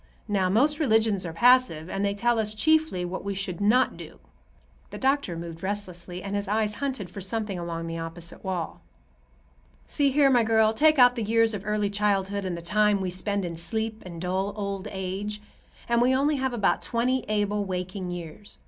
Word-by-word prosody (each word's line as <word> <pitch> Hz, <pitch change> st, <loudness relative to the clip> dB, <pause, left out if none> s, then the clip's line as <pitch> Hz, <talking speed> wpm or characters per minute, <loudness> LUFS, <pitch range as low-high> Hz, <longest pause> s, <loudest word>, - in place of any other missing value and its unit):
Now, 195 Hz, -3 st, +1 dB
most 285 Hz, -, +2 dB
religions 220 Hz, -, +2 dB
are 165 Hz, -, -6 dB
passive, 240 Hz, -6 st, +4 dB
and 195 Hz, +2 st, -3 dB
they 200 Hz, 0 st, 0 dB
tell 235 Hz, +2 st, +1 dB
us 215 Hz, -1 st, -1 dB
chiefly 315 Hz, -, +2 dB
what 180 Hz, +2 st, -5 dB
we 200 Hz, 0 st, -3 dB
should 190 Hz, -2 st, -3 dB
not 240 Hz, +6 st, +3 dB
do." -, -, -10 dB, 0.7 s
The -, -, -8 dB
doctor 270 Hz, -10 st, 0 dB
moved 165 Hz, -1 st, -7 dB
restlessly, 185 Hz, -3 st, -5 dB
and 200 Hz, +1 st, -4 dB
his 205 Hz, 0 st, -2 dB
eyes 210 Hz, +1 st, 0 dB
hunted 255 Hz, -10 st, -3 dB
for 200 Hz, -, -7 dB
something 200 Hz, -1 st, -3 dB
along 165 Hz, -1 st, -4 dB
the 165 Hz, 0 st, -4 dB
opposite 165 Hz, +1 st, -7 dB
wall: 185 Hz, -4 st, -4 dB, 1.0 s
"See 285 Hz, -1 st, +1 dB
here, 275 Hz, 0 st, +4 dB
my 245 Hz, -2 st, +5 dB
girl, 220 Hz, 0 st, +3 dB
take 310 Hz, +5 st, +4 dB
out 245 Hz, -1 st, +6 dB
the 235 Hz, -, -3 dB
years 225 Hz, +1 st, +2 dB
of 205 Hz, 0 st, -6 dB
early 210 Hz, -1 st, 0 dB
childhood 200 Hz, -1 st, 0 dB
and 180 Hz, -2 st, -3 dB
the 170 Hz, -, -8 dB
time 210 Hz, +2 st, +2 dB
we 185 Hz, -1 st, -2 dB
spend 200 Hz, +1 st, +1 dB
in 170 Hz, -1 st, -5 dB
sleep 220 Hz, +5 st, -3 dB
and 170 Hz, -2 st, -8 dB
dull 190 Hz, +3 st, -1 dB
old 200 Hz, -2 st, -4 dB
age, 195 Hz, +2 st, -4 dB, 0.5 s
and 235 Hz, 0 st, +2 dB
we 255 Hz, +2 st, +4 dB
only 285 Hz, +2 st, +2 dB
have 265 Hz, -1 st, -1 dB
about 230 Hz, -5 st, +1 dB
twenty 250 Hz, +1 st, 0 dB
able, 210 Hz, -1 st, 0 dB
waking 185 Hz, 0 st, -4 dB
years. 175 Hz, +3 st, -8 dB
205 Hz, 195 wpm, -26 LUFS, 185-230 Hz, 1.0 s, out